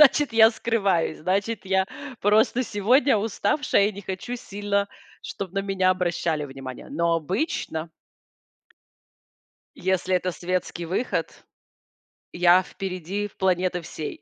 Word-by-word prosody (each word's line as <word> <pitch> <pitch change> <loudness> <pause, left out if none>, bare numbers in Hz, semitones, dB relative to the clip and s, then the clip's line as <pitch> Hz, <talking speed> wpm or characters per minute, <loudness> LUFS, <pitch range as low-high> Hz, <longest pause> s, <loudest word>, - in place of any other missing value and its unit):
Значит, 295 -2 +6
я 225 0 +8
скрываюсь. 200 -9 0
Значит, 200 +6 -1
я 190 0 +2 0.3
просто 220 +5 +3
сегодня 235 +4 +3
уставшая 205 +1 +1
и 215 - -5
не 200 - -8
хочу 195 +6 -5
сильно, 200 -2 -2 0.4
чтоб 195 -2 -6
на 195 - -3
меня 195 -1 +1
обращали 170 -4 0
внимание. 135 -2 -8
Но 170 +3 +1
обычно 165 - -2 1.9
если 185 0 0
это 180 0 0
светский 175 -1 -3
выход, 190 +9 -2 0.9
я 175 +1 +5
впереди 190 +1 -4
планеты 185 -1 +1
всей. 160 -2 -7
190 Hz, 115 wpm, -25 LUFS, 175-205 Hz, 1.9 s, я